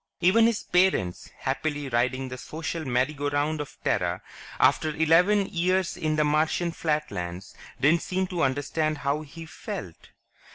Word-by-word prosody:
Even 210 +6 +5
his 230 -2 -1
parents, 180 - +1
happily 145 +2 -2
riding 130 +2 0
the 130 - -6
social 160 +3 -5
merry 130 +3 +1
go 145 0 -2
round 145 +2 0
of 145 - -9
Terra, - - 0 0.4
after 155 -1 +3
eleven 180 +6 +4
years 185 0 0
in 155 -1 -1
the 155 - +3
Martian 155 +3 +1
flatlands, 150 - -3 0.3
didn't 155 +6 +4
seem 185 +1 -1
to 180 -2 -3
understand 150 +3 0
how 140 +2 -1
he 160 +2 -10
felt. 160 - -8
155 Hz, 150 wpm, -26 LUFS, 140-170 Hz, 0.4 s, Even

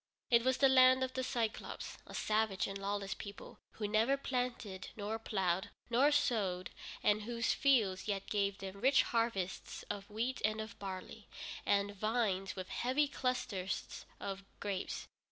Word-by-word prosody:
It 235 -1 +6
was 260 0 +3
the 275 - +6
Land 260 0 +7
of 260 0 -2
the 260 - -1
Cyclôpes, 235 -3 -3
a - - -8
savage 215 -2 +1
and 195 - -4
lawless 200 0 -2
people, 200 -1 -9
who 210 - -2
never 225 +6 +3
planted, 245 -8 -2
nor 215 +2 -2
plowed, 190 -4 0 0.2
nor 270 +5 +5
sowed, 205 -11 +1 0.3
and 210 +1 +4
whose 230 +1 0
fields 220 -10 +3
yet 200 -2 -1
gave 200 -1 0
them 195 0 -7
rich 265 +2 +6
harvests 230 -6 -1
of 205 0 -6
wheat 235 +5 -2
and 215 +1 +2
of 220 0 -6
barley, 195 +2 -6 0.4
and 200 0 +2
vines 205 -3 0
with 185 -1 -6
heavy 265 +4 +2
clusters 235 -9 -2
of 195 0 -4 0.2
grapes. 200 -2 -3
215 Hz, 155 wpm, -35 LUFS, 195-245 Hz, 0.4 s, Land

